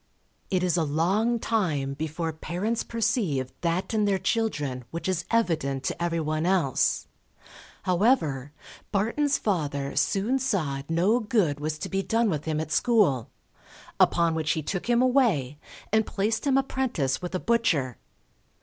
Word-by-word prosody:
It 185 Hz, -2 st, +1 dB
is 180 Hz, -2 st, +2 dB
a 165 Hz, -, +2 dB
long 190 Hz, +11 st, +1 dB
time 165 Hz, -13 st, 0 dB
before 160 Hz, +3 st, -3 dB
parents 180 Hz, +9 st, -2 dB
perceive 185 Hz, -, -1 dB
that 170 Hz, +5 st, -1 dB
in 215 Hz, -1 st, +2 dB
their 200 Hz, -1 st, +2 dB
children 145 Hz, -, -1 dB
which 170 Hz, +5 st, -5 dB
is 180 Hz, -2 st, -1 dB
evident 160 Hz, -, 0 dB
to 170 Hz, -, -2 dB
everyone 160 Hz, -1 st, -1 dB
else; 180 Hz, -8 st, +1 dB, 0.8 s
however, 170 Hz, -, +1 dB, 0.4 s
Barton's 255 Hz, +8 st, +1 dB
father 145 Hz, -8 st, -2 dB
soon 220 Hz, +7 st, +1 dB
saw 170 Hz, -, -1 dB
no 185 Hz, +9 st, +3 dB
good 205 Hz, -10 st, +1 dB
was 155 Hz, +1 st, -3 dB
to -, -, -5 dB
be 195 Hz, 0 st, -1 dB
done 225 Hz, +1 st, +1 dB
with 150 Hz, -2 st, -3 dB
him 155 Hz, -1 st, -1 dB
at 155 Hz, -1 st, -4 dB
school; 175 Hz, -, +2 dB, 0.7 s
upon 170 Hz, -1 st, +4 dB
which 160 Hz, -1 st, 0 dB
he 155 Hz, -, -3 dB
took 190 Hz, +8 st, -3 dB
him 240 Hz, +1 st, +4 dB
away, 205 Hz, -, +2 dB, 0.3 s
and 220 Hz, 0 st, +4 dB
placed 220 Hz, +6 st, -1 dB
him 270 Hz, -1 st, +4 dB
apprentice 250 Hz, -, -1 dB
with 180 Hz, +1 st, -4 dB
a -, -, 0 dB
butcher. 165 Hz, -, +1 dB
175 Hz, 150 wpm, -26 LUFS, 150-225 Hz, 0.8 s, upon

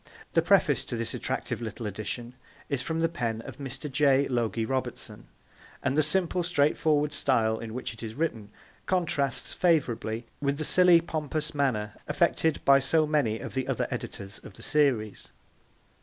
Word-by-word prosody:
The -, -, +4 dB
preface -, -, +3 dB
to -, -, -4 dB
this 115 Hz, -1 st, -3 dB
attractive -, -, -3 dB
little 115 Hz, 0 st, -5 dB
edition 110 Hz, +4 st, -4 dB, 0.4 s
is 140 Hz, -3 st, -1 dB
from 160 Hz, +4 st, -2 dB
the 165 Hz, -, +4 dB
pen 115 Hz, -9 st, -3 dB
of -, -, -10 dB
Mr. 140 Hz, +2 st, -6 dB
J. 140 Hz, -1 st, +3 dB
Logie 115 Hz, -3 st, 0 dB
Robertson, 130 Hz, +1 st, -4 dB, 0.6 s
and 130 Hz, -, +1 dB
the 155 Hz, -, +5 dB
simple, 175 Hz, +3 st, +2 dB
straightforward 150 Hz, -2 st, +2 dB
style 110 Hz, -4 st, +1 dB
in 115 Hz, 0 st, -7 dB
which 125 Hz, -, -4 dB
it 115 Hz, -, -12 dB
is 110 Hz, -1 st, -6 dB
written 115 Hz, -10 st, -2 dB, 0.4 s
contrasts 145 Hz, -8 st, 0 dB
favourably 125 Hz, -, +1 dB, 0.2 s
with 140 Hz, 0 st, 0 dB
the 155 Hz, -, -2 dB
silly 180 Hz, -1 st, +6 dB
pompous 155 Hz, -2 st, -3 dB
manner 115 Hz, -8 st, 0 dB
affected 160 Hz, +1 st, +1 dB
by 140 Hz, 0 st, +7 dB
so 155 Hz, +4 st, +2 dB
many 145 Hz, -8 st, +1 dB
of -, -, -7 dB
the 130 Hz, -1 st, -2 dB
other -, -, -1 dB
editors 100 Hz, +1 st, -5 dB
of -, -, -12 dB
the -, -, -11 dB
series. 120 Hz, -, +1 dB
140 Hz, 165 wpm, -28 LUFS, 115-155 Hz, 0.6 s, by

